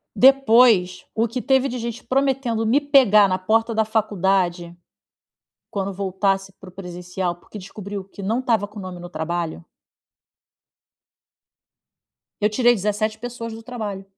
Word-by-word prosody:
Depois, 230 -8 +5
o 225 +1 +1
que 235 +3 -4
teve 265 +1 +2
de 250 -1 -4
gente 235 0 -5
prometendo 260 -4 0
me 250 +6 +3
pegar 260 -8 +5
na 185 0 0
porta 225 +4 +1
da 220 - +3
faculdade, 190 -5 0 0.9
quando 200 -1 -3
voltasse 195 0 -1
para 190 - -12
o 185 - -14
presencial, 180 -1 -5
porque 175 - -15
descobriu 200 0 -7
que 195 +1 -14
não 225 +6 0
estava 230 -5 +1
com 210 0 -10
nome 185 -2 -7
no 175 0 -9
trabalho. 165 - -4 2.8
Eu 210 - +3
tirei 240 +2 +4
17 215 +1 -2
pessoas 235 -1 -6
do 225 +1 -9
trabalho. 215 -5 -6
210 Hz, 140 wpm, -22 LUFS, 185-235 Hz, 2.8 s, Depois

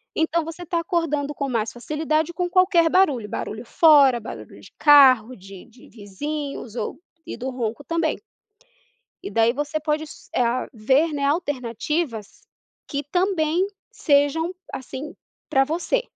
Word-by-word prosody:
Então 320 0 0
você 330 +2 -8
tá 340 +1 -1
acordando 325 -5 -1
com 280 -1 -3
mais 225 -2 -1
facilidade 310 +5 -2
com 355 0 -2
qualquer 360 -3 +4
barulho, 290 - +2
barulho 220 +4 -5
fora, 280 -3 +5
barulho 110 - -10
de - - -16
carro, 260 -5 +6
de 195 -1 -13
de 240 +2 -19
vizinhos 245 +4 -6
ou - - -4 0.3
e - - -6
do 260 +2 -4
ronco 240 +2 -4
também. 330 0 -1 1.0
E 395 - -5
daí 230 +1 +3
você 295 +3 -3
pode 305 0 -1
s 305 - -14
a 245 +1 +1
ver, 265 +8 +2
né, 280 -1 -2
alternativas 290 - -2 0.4
que 285 0 -3
também 355 +2 +1 0.2
sejam 295 +4 +1 0.2
assim 265 +3 -7 0.3
pra 270 - +3
você. 350 - -1
290 Hz, 140 wpm, -23 LUFS, 245-325 Hz, 1.0 s, carro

